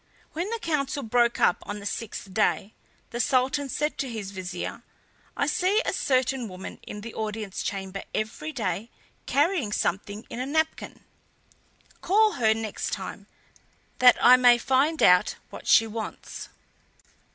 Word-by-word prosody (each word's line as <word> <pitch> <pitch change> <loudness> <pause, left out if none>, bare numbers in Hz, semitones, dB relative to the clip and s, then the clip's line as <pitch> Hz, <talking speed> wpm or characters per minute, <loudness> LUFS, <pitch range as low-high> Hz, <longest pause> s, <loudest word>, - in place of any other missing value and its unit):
When 345 +6 -2
the 460 - -2
council 290 -7 -2
broke 235 +1 +2
up - - +4
on 205 - -6
the 200 - -9
sixth 205 -2 -5
day 210 0 +1 0.4
the 240 - -4
Sultan 270 +2 +1
said 300 +3 -2
to 270 - -2
his 215 -4 -5
Vizier: 185 -2 -5 0.6
"I - - +2
see 365 +8 +2
a - - 0
certain 260 -2 +1
woman 185 -1 -8
in 210 - -8
the 230 +2 -8
audience 215 -2 -4
chamber 195 0 -4
every 230 +9 -3
day 220 - -3 0.4
carrying 290 - +1
something 205 +2 -2
in 235 - -7
a 255 - -2
napkin. 315 +2 -1 1.0
Call 430 +3 +4
her 220 - +2
next 220 -1 -4
time, - - -6 0.7
that 250 -1 +7
I 250 +1 +8
may 245 -1 +6
find 270 +6 +1
out 180 0 +5 0.2
what - - -10
she 225 - +6
wants." 225 0 -7
240 Hz, 150 wpm, -26 LUFS, 210-285 Hz, 1.0 s, I